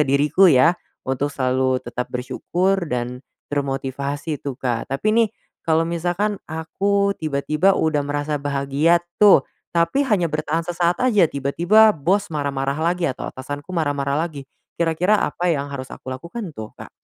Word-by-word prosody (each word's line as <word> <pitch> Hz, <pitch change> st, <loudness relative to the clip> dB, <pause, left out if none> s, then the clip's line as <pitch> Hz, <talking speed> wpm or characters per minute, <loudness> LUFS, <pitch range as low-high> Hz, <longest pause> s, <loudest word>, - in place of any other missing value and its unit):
diriku 150 Hz, +7 st, +4 dB
ya, 155 Hz, +4 st, +6 dB, 0.3 s
untuk 135 Hz, +2 st, -1 dB
selalu 130 Hz, -1 st, 0 dB
tetap 120 Hz, +1 st, -4 dB
bersyukur 175 Hz, +10 st, -1 dB
dan 125 Hz, 0 st, -3 dB, 0.3 s
termotivasi 140 Hz, +2 st, -3 dB
tuh 140 Hz, -2 st, -4 dB
Kak. 120 Hz, -3 st, -2 dB
Tapi 135 Hz, +9 st, -3 dB
nih, 230 Hz, -1 st, +4 dB, 0.4 s
kalo 160 Hz, 0 st, +3 dB
misalkan 175 Hz, +5 st, -1 dB
aku 200 Hz, +6 st, 0 dB
tiba-tiba 155 Hz, +5 st, +1 dB
udah 160 Hz, -2 st, +1 dB
merasa 145 Hz, +1 st, -2 dB
bahagia 145 Hz, +4 st, +1 dB, 0.2 s
tuh, 205 Hz, -2 st, +7 dB, 0.3 s
tapi 170 Hz, +12 st, +2 dB
hanya 185 Hz, -9 st, +1 dB
bertahan 155 Hz, +2 st, -1 dB
sesaat 175 Hz, +2 st, 0 dB
aja, 215 Hz, -8 st, +4 dB
tiba-tiba 170 Hz, +11 st, +4 dB
bos 195 Hz, +4 st, 0 dB
marah-marah 140 Hz, -2 st, -2 dB
lagi, 170 Hz, -1 st, 0 dB
atau -, -, -6 dB
atasanku 145 Hz, +6 st, -7 dB
marah-marah 145 Hz, -3 st, 0 dB
lagi, 145 Hz, -5 st, -6 dB, 0.3 s
kira-kira 170 Hz, +5 st, +2 dB
apa 175 Hz, +2 st, 0 dB
yang 145 Hz, -3 st, -1 dB
harus 140 Hz, -2 st, -7 dB
aku -, -, -11 dB
lakukan 170 Hz, -, -7 dB
tuh 110 Hz, -3 st, -7 dB
Kak? -, -, -10 dB
155 Hz, 145 wpm, -21 LUFS, 140-175 Hz, 0.4 s, tuh